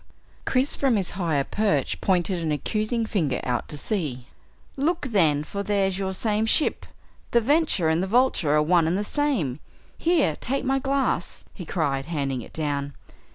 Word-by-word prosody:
Chris 260 +2 +1
from 270 -4 +2
his 195 -4 -1
higher 165 -6 0
perch, 155 - 0
pointed 180 -1 +1
an 160 -2 -1
accusing 215 - -1
finger 160 -12 -1
out 125 -1 -2
to 150 - -5
sea. 145 - -3 0.5
"Look 320 +4 0
then, 155 -8 +3
for 200 +6 -5
there's 195 -2 0
your 190 -1 -1
same 215 +1 0
ship! 300 - +2 0.4
The 235 - +4
Venture 285 - +2
and 160 +2 +2
the 190 - -1
Vulture 215 - +2
are 150 - +4
one 170 0 +3
and 175 +3 +1
the 205 - -1
same! 210 - -1 0.4
Here 335 -2 +2
take 275 +2 -2
my 270 +1 +2
glass," 270 -8 -1
he 180 - -9
cried 140 -5 -1
handing 140 -6 -2
it - - -12
down. 145 -2 -2
190 Hz, 170 wpm, -25 LUFS, 150-235 Hz, 0.5 s, The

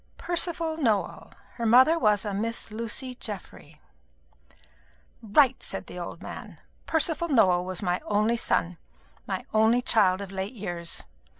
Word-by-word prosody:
"Percival 335 -2 0
Nowell. 225 -10 -1 0.3
Her 235 - -3
mother 260 +8 +6
was 210 -4 +2
a 205 - -3
Miss 225 +2 -3
Lucy 230 +4 -4
Geoffry." 190 -9 -8 1.4
"Right," 255 +4 +3
said - - -3
the - - -9
old - - -7
man. - - -9 0.3
"Percival 325 +1 +2
Nowell 185 - +3
was 185 +1 -5
my 180 -1 0
only 215 +3 +1
son 180 -6 -1 0.5
my - - -4
only 220 +3 +3
child 195 -6 +3
of 200 -1 -7
late 195 +3 -4
years. 175 -5 -3
220 Hz, 135 wpm, -26 LUFS, 195-255 Hz, 1.4 s, mother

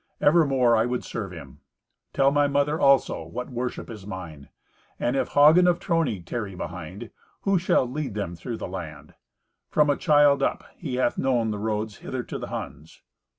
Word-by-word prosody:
Evermore 135 -7 +4
I 110 +1 +2
would 125 0 -2
serve 105 -5 -5
him. 75 -5 -11 0.5
Tell 135 0 +3
my 145 0 +3
mother, 145 +2 +1
also, 140 -1 +3
what 125 +2 -7
worship 125 0 -4
is 105 -4 -10
mine. 85 -7 -8 0.5
And 120 - 0
if - - -1
Hagen 155 +5 +7
of 175 -1 +3
Trony 160 - -1
tarry 105 -1 -4
behind, 90 +5 -7 0.3
who 195 -2 +2
shall 170 -6 +2
lead 130 -3 -4
them 100 -4 -3
through 115 +6 -6
the - - -5
land? 80 -5 -8 0.6
From 150 -1 +3
a - - +1
child 145 -2 +4
up - - 0
he 125 - -5
hath 125 -1 0
known 120 -4 +1
the 105 - -4
roads 105 0 -2
hither 130 -2 -5
to - - -6
the - - -6
Huns." 75 +4 -8
120 Hz, 180 wpm, -25 LUFS, 95-140 Hz, 0.6 s, Hagen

